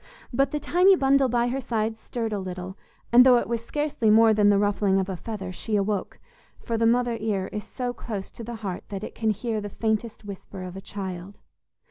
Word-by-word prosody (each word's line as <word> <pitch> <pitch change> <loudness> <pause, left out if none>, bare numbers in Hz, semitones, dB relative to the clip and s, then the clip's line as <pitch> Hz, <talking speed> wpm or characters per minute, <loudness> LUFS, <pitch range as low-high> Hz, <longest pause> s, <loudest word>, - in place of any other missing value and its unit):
But 275 +3 +2
the 300 - -2
tiny 365 +5 +5
bundle 275 -3 +3
by 240 0 +1
her 270 +2 -2
side 220 -2 -2
stirred 225 -2 -4
a 205 - -1
little, 185 0 -6 0.4
and 245 +1 +9
though 250 -1 +7
it - - -1
was 230 -1 -2
scarcely 295 -4 -1
more 220 +1 +6
than 205 -1 +4
the 200 - +5
ruffling 200 -1 +2
of 190 0 -2
a 190 - -2
feather, 195 -1 -6
she 210 +4 -3
awoke; 200 -1 -1 0.4
for 230 - -3
the 225 0 +3
mother 240 0 +2
ear 200 -4 -1
is 210 - -4
so 245 -1 -4
close 210 -5 -6
to 235 - -9
the 235 +1 -6
heart 185 -2 -4
that 200 0 -5
it - - -6
can 220 -1 -1
hear 215 +1 -1
the 205 - -5
faintest 220 +1 -2
whisper 195 -1 -8
of 180 0 -7
a 195 - -7
child. 190 -1 -7
220 Hz, 220 wpm, -25 LUFS, 200-240 Hz, 0.4 s, and